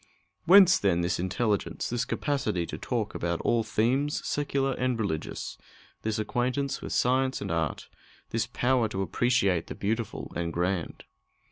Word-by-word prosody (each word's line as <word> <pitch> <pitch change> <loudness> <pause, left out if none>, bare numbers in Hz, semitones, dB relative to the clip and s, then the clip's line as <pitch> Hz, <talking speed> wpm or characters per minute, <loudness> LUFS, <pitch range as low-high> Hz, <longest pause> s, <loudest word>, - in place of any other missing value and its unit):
Whence, 190 0 +8
then, 85 -4 +2
this 85 +1 0
intelligence 100 +3 -1
this 120 +1 0
capacity 125 - -1
to - - -6
talk - - -2
about 85 0 -2
all 115 - +2
themes, 120 +7 0
secular 140 -2 0
and 125 -2 -1
religious 95 -8 -3 0.4
this 110 0 -1
acquaintance 130 +5 -1
with - - -6
science 130 +1 +2
and 100 - -4
art 80 -3 -2 0.4
this 110 -1 0
power 125 0 +1
to 95 -2 -2
appreciate 100 -6 +1
the - - -6
beautiful 110 +2 -3
and 85 -1 -2
grand? 90 0 -2
115 Hz, 145 wpm, -28 LUFS, 95-130 Hz, 0.4 s, Whence